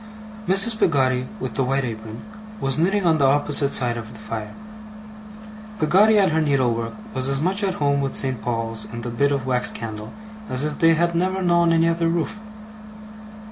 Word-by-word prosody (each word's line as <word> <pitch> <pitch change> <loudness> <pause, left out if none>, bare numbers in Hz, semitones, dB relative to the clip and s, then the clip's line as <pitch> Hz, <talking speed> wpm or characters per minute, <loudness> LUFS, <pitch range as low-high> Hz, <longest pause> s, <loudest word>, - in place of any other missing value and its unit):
Mrs. 210 +4 +3
Peggotty 130 -5 +1
with - - -5
the 135 - 0
white 135 +2 0
apron, 110 -1 -7 0.4
was 135 -1 -1
knitting 195 +3 +1
on 160 -2 +3
the 140 - +4
opposite 145 0 +3
side 120 -3 +2
of 110 -2 -8
the 110 - -12
fire. 110 -1 -7 1.2
Peggotty 200 +7 +4
at 195 -4 +3
her 160 +1 +1
needlework 125 -6 0 0.2
was 130 0 -1
as 135 0 0
much 190 +6 -1
at 190 -2 -1
home 140 -1 0
with 135 -1 -2
St. 130 -4 -2
Paul's 115 -2 -3
and 115 0 -7
the 120 - -4
bit 140 +5 +1
of 140 -3 -2
wax 125 -1 +2
candle, 110 -1 -6 0.4
as 130 +2 -1
if 150 - -4
they 165 0 +5
had 170 +1 +1
never 185 +2 -1
known 170 -1 +3
any 165 0 +3
other 165 0 0
roof. 170 +5 -2
140 Hz, 185 wpm, -22 LUFS, 120-170 Hz, 1.2 s, they